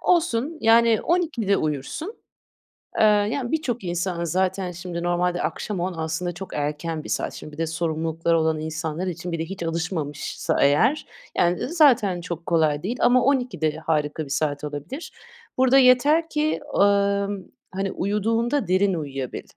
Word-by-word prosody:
Olsun, 320 -3 +1
yani 230 0 +5
12'de 305 - +1
uyursun. 155 - -3 0.8
Eee, - - +6
yani 215 +4 +2
birçok 255 -8 -1
insan 175 0 -2
zaten 185 +2 0
şimdi 175 0 -6
normalde 175 0 0
akşam 205 -4 -3
10 180 +2 -2
aslında 165 +2 -3
çok 185 +2 -9
erken 150 +2 -3
bir - - -9
saat, - - -1
şimdi 150 - -9
bir - - -11
de 165 0 -1
sorumlulukları 165 0 0
olan 160 -1 +1
insanlar 160 +2 -3
için 175 0 -4
bir 165 - -3
de 160 - -2
hiç 185 +1 -6
alışmamışsa 165 -3 -2
eğer 225 - +3 0.3
yani, 175 +1 +2
eee, - - -2
zaten 250 - +3
çok 170 -1 -6
kolay 155 -3 +1
değil 235 +7 -2
ama 250 0 +4
12'de 250 - 0
harika 155 -1 -1
bir - - -12
saat 145 +1 -1
olabilir. 150 - -6 0.5
Burada 260 +1 +5
yeter 280 +6 +5
ki, 305 0 0 0.2
ımm, 200 -1 +2 0.3
hani, 195 +1 -2
uyuduğunda 225 +7 0
derin 190 +2 +3
uyuyabil. 135 -6 -4
180 Hz, 155 wpm, -24 LUFS, 160-230 Hz, 0.8 s, Eee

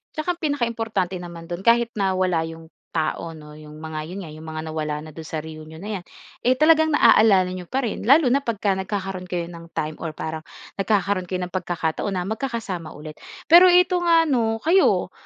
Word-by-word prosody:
Tsaka 335 +3 -1
ang - - -33
pinaka-importante 230 - -1
naman 170 -1 -9
do'n 175 +2 -5
kahit 235 0 +4
na 195 -1 +1
wala 180 -3 +1
'yong 165 0 -10 0.3
tao 160 +1 -1
'no, 150 -1 -12
'yong 150 0 -12
mga 155 0 -6
'yon 190 - -6
nga, 155 - -9
'yong 155 +1 -11
mga 155 0 -5
nawala 155 -1 -2
na 155 - -10
do'n 160 +1 -9
sa 160 - -4
reunion 155 0 -10
na 200 +2 -5
'yan, - - -15 0.4
eh 255 +2 +3
talagang 315 +1 +5
naaalala 215 -10 +5
n'yo 180 -1 -7
pa 265 0 -1
rin 215 - -3
lalo 290 +4 +6
na 275 +2 +3
pagka 210 -6 0
nagkakaroon 190 -1 -4
kayo 175 -2 -2
ng 170 -1 -11
time 155 0 -3
or 160 -2 -5
parang 160 0 -4 0.4
nagkakaroon 195 -2 0
kayo 185 -1 -2
ng 180 - -11
pagkakataon 175 -1 -2
na 180 - -1
magkakasama 220 - -4
ulit. 155 +1 -10 0.3
Pero 345 +3 +8
ito 360 0 +4
nga 335 -1 +5
'no, 230 -6 +1
kayo, 365 +4 +3
185 Hz, 200 wpm, -23 LUFS, 160-235 Hz, 0.4 s, Pero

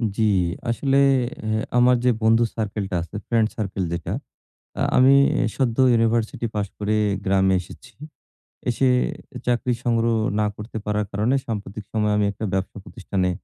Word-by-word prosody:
জি, - - -1 0.5
আসলে 135 +3 +1 0.4
অ্যা 110 0 -1 0.2
আমার 125 +1 +5
যে - - +5
বন্ধু 115 +1 +4
সার্কেলটা 100 -3 -3
আছে, 85 - -9
ফ্রেন্ড 115 -2 +2
সার্কেল 100 -3 -2
যেটা, 85 -2 -4 0.7
আ - - -1 0.2
আমি 130 +2 +6 0.4
সদ্য 120 -4 0 0.2
University 115 0 0
পাস 105 -1 -1
করে 105 +1 0 0.3
গ্রামে 95 0 +3
এসেছি। - - -14 0.8
এসে 125 +2 +1 0.6
চাকরি 125 0 +1
সংগ্রহ 115 -1 +1 0.2
না 105 - +2
করতে 105 +2 -7
পারার 105 0 0
কারণে 110 +6 +1
সাম্প্রতিক 105 -1 -5
সময়ে 105 -1 +1
আমি 105 0 +2
১ - - -14
টা 110 - -2
ব্যবসা 95 +2 -2
প্রতিষ্ঠানে 95 -1 -2
110 Hz, 145 wpm, -23 LUFS, 100-115 Hz, 0.8 s, আমি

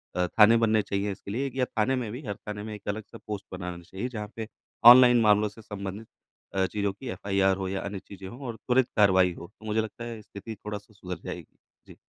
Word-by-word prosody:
अ, 90 0 +1
थाने 110 +5 +6
बनने 110 -1 +3
चाहिए 100 0 -2
इसके 100 +1 -8
लिए, 135 +5 -2
या 130 -1 +2
थाने 125 +3 0
में 120 -4 -3
भी 125 +5 -6
हर 100 -2 -3
थाने 105 -1 -4
में 110 0 -6
एक 105 - -14
अलग 110 +2 -3
से - - -9
पोस्ट 105 -2 -4
बनाना 90 -1 -6
चाहिए 95 +8 -5
जहाँ 105 -3 -6
पे 110 -1 -5 0.5
ऑनलाइन 125 -1 +6
मामलों 105 -1 +4
से 110 +2 -14
संबंधित 100 +1 -7 0.5
अ, 95 -1 +3
चीज़ों 100 0 -1
की 130 +7 -10
एफआईआर 95 -3 +1
हो 95 -1 -3
या 95 0 -2
अन्य 100 0 -5
चीज़ें 95 0 -11
हों 120 +7 -10
और 115 - -4
त्वरित 125 +3 +1
कार्रवाई 95 -3 +5
हो 85 - -10
तो 110 - -13
मुझे 110 +1 +1
लगता 110 +2 -7
है 115 -2 -6
स्थिति 105 +2 -9
थोड़ा-सा 105 +1 -8
सुधर 90 -3 -7
जाएगी। - - -8 0.3
जी। - - -13
105 Hz, 235 wpm, -27 LUFS, 95-115 Hz, 0.5 s, थाने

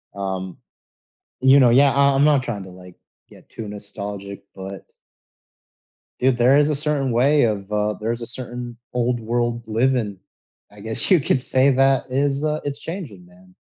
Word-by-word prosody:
Um, 95 -2 -5 0.8
you 130 +2 +6
know, 125 -3 +6
yeah, 135 +3 +5
I 140 0 +3
I'm 135 - +3
not 145 -3 +4
trying 110 -6 -5
to, 95 - -12
like, 90 0 -14 0.3
get - - -18
too 110 -2 -8
nostalgic, 100 -1 -7
but 95 0 -8 1.4
dude, 130 -1 +2
there 130 +4 +5
is 150 0 +3
a 150 - +1
certain 145 -3 -1
way 140 +5 +3
of, 105 -2 -2
uh 105 0 0
There's 115 +3 -4
a 115 - -5
certain 120 -1 -5 0.2
old-world 120 -1 -1
living, 110 -3 0 0.5
I 105 - -14
guess 110 - -1
you 185 - +6
could 130 - +1
say, 130 +2 +3
that 135 0 +2
is, 140 +2 0
uh 155 0 0
it's 145 0 -4
changing, 145 - -8
man, 90 +1 -21
120 Hz, 165 wpm, -21 LUFS, 105-135 Hz, 1.4 s, you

